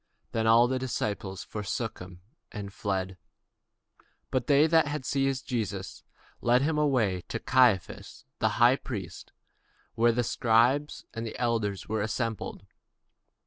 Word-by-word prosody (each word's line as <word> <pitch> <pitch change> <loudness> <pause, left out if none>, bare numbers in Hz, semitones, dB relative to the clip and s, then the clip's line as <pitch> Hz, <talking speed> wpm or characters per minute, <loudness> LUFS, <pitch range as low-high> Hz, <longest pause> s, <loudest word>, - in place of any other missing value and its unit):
Then 110 0 0
all 115 +2 +6
the 130 +1 -1
disciples 105 -6 -3
forsook 110 +2 -4
him, 90 -1 -11 0.3
and 100 -2 -7
fled. 95 -3 -3 1.1
And 130 -2 +1
they 145 +1 +5
that 160 -1 +4
had 145 -2 -4
laid 140 - +1
hold 135 - +3
on - - -8
Jesus 100 -6 -4 0.4
led 125 +2 +3
him 150 +1 +1
away 120 -11 +1
to - - -3
Caiaphas 125 -8 +1
the - - +2
high 120 +3 +5
priest, 95 -12 -7 0.6
where 120 +1 +3
the 120 +1 0
scribes 120 +6 +2
and 115 - -4
the 115 - -6
elders 110 -5 -1
were 110 0 -1
assembled. 110 +1 -3
115 Hz, 145 wpm, -28 LUFS, 100-130 Hz, 1.1 s, all